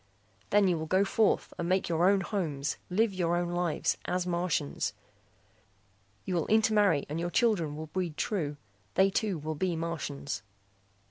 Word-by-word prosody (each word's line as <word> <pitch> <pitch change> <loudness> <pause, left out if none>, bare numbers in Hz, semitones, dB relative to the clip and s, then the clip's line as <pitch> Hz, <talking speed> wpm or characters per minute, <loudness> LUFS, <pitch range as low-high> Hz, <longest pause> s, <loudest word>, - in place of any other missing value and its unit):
"Then 205 -1 +4
you 175 -3 +1
will 160 - -4
go 190 +4 +3
forth 210 +2 +1
and 170 0 -1
make 185 +1 +2
your 170 +2 +3
own 200 -1 +3
homes, 155 -10 -2
live 210 +3 +2
your 175 -2 +1
own 175 0 -1
lives, 175 -3 0
as 180 0 -1
Martians. 170 - -1 1.3
You 185 - -2
will 170 -3 0
intermarry 210 -8 +3
and 150 +3 -3
your 175 +1 -1
children 175 -9 +1
will 155 +1 -5
breed 170 -1 -3
true. 150 -9 -1 0.4
They 195 +1 +4
too 200 -2 0
will 155 +1 -4
be 175 +3 -1
Martians. 160 -6 -4
175 Hz, 160 wpm, -30 LUFS, 160-195 Hz, 1.3 s, Then